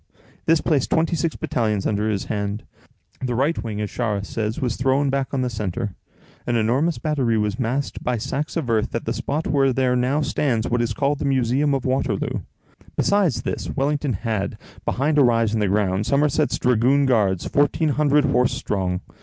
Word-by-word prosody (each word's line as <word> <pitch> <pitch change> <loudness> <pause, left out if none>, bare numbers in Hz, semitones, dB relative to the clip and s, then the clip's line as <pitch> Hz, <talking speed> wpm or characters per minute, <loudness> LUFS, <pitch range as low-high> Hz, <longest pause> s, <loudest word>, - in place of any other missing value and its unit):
This 165 -1 +4
placed 145 -5 +1
twenty 165 +1 +2
six 165 0 -1
battalions 110 -5 -1
under 105 +1 0
his 100 -2 -1
hand. 105 0 -3 0.6
The 125 -2 -1
right 140 +5 0
wing, 110 -3 -4
as 105 -1 -3
Charras 105 -5 -2
says, 110 +1 -3
was 125 -3 -1
thrown 135 +2 +1
back 135 -2 -1
on 130 -2 0
the - - 0
centre. 105 -2 -3 0.5
An 120 - +1
enormous 130 +9 +1
battery 135 -7 0
was 105 +2 -1
masked 130 +3 -2
by 125 -1 0
sacks 140 +8 -3
of 155 -6 -2
earth 110 -1 0
at 115 - -3
the 115 - -1
spot 150 +5 -2
where 135 -2 +2
there 125 0 +1
now 130 +4 +1
stands 125 -6 0
what 120 0 +1
is 115 -2 -1
called 140 +4 0
the - - -2
"Museum 135 +2 +2
of 135 - -3
Waterloo." 130 -5 0 0.6
Besides 180 - +2
this, - - -3
Wellington 145 -1 0
had, 110 -1 -2 0.3
behind 145 +4 +1
a - - +7
rise 115 -3 +2
in 110 - +1
the 105 - +1
ground, 100 0 +1
Somerset's 145 +1 +2
Dragoon 125 +4 +3
Guards, 105 -8 +2
fourteen 145 +2 +2
hundred 145 0 +3
horse 125 +1 +2
strong. 90 -3 -2
125 Hz, 185 wpm, -22 LUFS, 110-140 Hz, 0.6 s, a